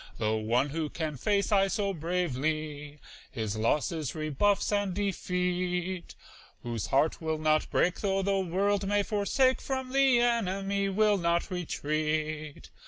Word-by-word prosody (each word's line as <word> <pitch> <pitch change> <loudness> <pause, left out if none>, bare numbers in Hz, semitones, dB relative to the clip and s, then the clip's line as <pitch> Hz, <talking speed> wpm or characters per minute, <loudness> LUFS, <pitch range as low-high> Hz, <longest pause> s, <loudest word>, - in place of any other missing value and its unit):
The 110 0 0
one 115 +6 +1
who 155 +1 -2
can 155 -2 -3
face, 200 - 0
aye, 195 -1 +4
so 200 0 -1
bravely 155 -3 -2 0.3
His 110 -4 -3
losses, 145 +6 0
rebuffs, 155 +8 +1
and 205 -3 0
defeat; 180 -2 -2 0.5
Whose 115 -3 -3
heart 150 +5 +1
will 160 -1 -1
not 155 0 +1
break 180 - +1
though 195 -1 0
the 195 0 +1
world 195 +2 0
may 205 0 +2
forsake, 240 +6 +1
From 260 -1 -3
the 270 -3 +5
enemy 200 -4 0
will 205 +1 +3
not 170 +1 0
retreat. 155 -3 -3
180 Hz, 135 wpm, -29 LUFS, 155-200 Hz, 0.5 s, the